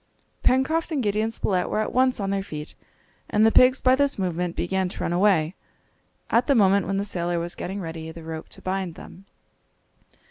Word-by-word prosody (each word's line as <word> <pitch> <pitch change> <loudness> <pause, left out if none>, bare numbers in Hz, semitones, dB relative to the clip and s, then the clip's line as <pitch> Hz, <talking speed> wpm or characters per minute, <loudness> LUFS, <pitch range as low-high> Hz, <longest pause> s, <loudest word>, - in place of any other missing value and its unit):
Pencroft 315 +7 +1
and 285 -5 -1
Gideon 215 +1 0
Spilett 190 -5 -1
were - - -1
at 215 - -1
once 255 -1 +2
on 195 -1 -2
their 200 0 0
feet, 150 -5 -7 0.6
and 210 +1 +3
the 225 - +5
pigs 255 +3 +5
by 255 0 +5
this 280 0 +1
movement 180 -2 -2
began 190 +1 -1
to - - -8
run 170 - -1
away, 180 -3 +3 0.8
at 235 +3 +3
the 280 - +4
moment 200 -4 +4
when 195 +1 -1
the 200 - -1
sailor 175 -3 -1
was 170 +1 -3
getting 190 +3 -5
ready 160 -2 -6
the 165 0 -11
rope 160 0 -7
to - - -11
bind 185 -3 -3
them. 190 +3 -13
195 Hz, 200 wpm, -24 LUFS, 175-225 Hz, 0.8 s, the